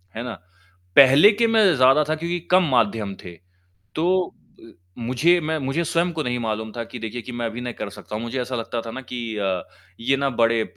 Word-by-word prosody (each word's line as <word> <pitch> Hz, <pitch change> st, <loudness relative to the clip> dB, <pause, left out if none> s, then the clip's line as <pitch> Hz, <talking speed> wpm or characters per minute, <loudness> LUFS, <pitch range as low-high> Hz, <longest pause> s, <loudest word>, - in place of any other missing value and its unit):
है 115 Hz, -, -4 dB
ना? 125 Hz, -1 st, -5 dB, 0.6 s
पहले 140 Hz, -, +8 dB
के 230 Hz, +3 st, +2 dB
मैं 225 Hz, -1 st, +4 dB
ज़्यादा 135 Hz, +4 st, +5 dB
था 155 Hz, -, +1 dB
क्योंकि 170 Hz, +2 st, -3 dB
कम 185 Hz, +1 st, +6 dB
माध्यम 110 Hz, -4 st, +1 dB
थे। 85 Hz, -1 st, -10 dB, 0.6 s
तो 180 Hz, +4 st, +2 dB, 0.4 s
अ, -, -, -20 dB, 0.4 s
मुझे 130 Hz, +9 st, +2 dB
मैं 160 Hz, 0 st, -2 dB
मुझे 140 Hz, +4 st, -1 dB
स्वयं 170 Hz, +2 st, 0 dB
को 160 Hz, -1 st, -2 dB
नहीं 125 Hz, -3 st, -2 dB
मालूम 110 Hz, -1 st, -3 dB
था 120 Hz, -, -4 dB
कि 125 Hz, -, -9 dB
देखिए 115 Hz, +1 st, -6 dB
कि 125 Hz, -, -8 dB
मैं 120 Hz, -1 st, -3 dB
अभी 115 Hz, +1 st, -5 dB
नहीं 125 Hz, -1 st, -5 dB
कर 105 Hz, -, -5 dB
सकता 105 Hz, -1 st, -10 dB
हूँ। 110 Hz, -, -5 dB
मुझे 120 Hz, +3 st, -3 dB
ऐसा 125 Hz, +1 st, -5 dB
लगता 115 Hz, 0 st, -3 dB
था -, -, -5 dB
ना 130 Hz, -, -6 dB
कि 120 Hz, -3 st, -6 dB
अ, 95 Hz, -3 st, -1 dB, 0.4 s
ये 135 Hz, +4 st, +1 dB
ना 140 Hz, 0 st, 0 dB
बड़े 115 Hz, -2 st, +2 dB
125 Hz, 225 wpm, -22 LUFS, 115-155 Hz, 0.6 s, पहले